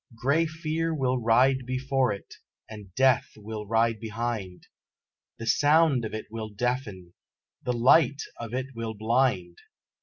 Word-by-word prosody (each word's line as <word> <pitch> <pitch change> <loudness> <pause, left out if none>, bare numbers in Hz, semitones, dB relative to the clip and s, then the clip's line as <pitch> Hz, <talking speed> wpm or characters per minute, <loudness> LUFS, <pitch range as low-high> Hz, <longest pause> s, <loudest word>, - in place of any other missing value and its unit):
Grey 140 +8 +1
Fear 160 +1 -2
will 130 -3 0
ride 130 +3 +3
before 130 -1 0
it, 100 - -8 0.3
and 105 -3 -11
Death 130 -1 +3
will 105 0 -7
ride 115 0 +1
behind, 110 -4 -4 0.7
The 115 - -7
sound 145 -1 +3
of 110 - -5
it 110 - -5
will 110 -1 -5
deafen, 105 -5 -3 0.5
the 125 - -1
light 135 +4 +4 0.2
of 115 -2 -6
it 130 +2 -4
will 115 -1 -5
blind! 110 -5 0
120 Hz, 140 wpm, -27 LUFS, 110-135 Hz, 0.7 s, light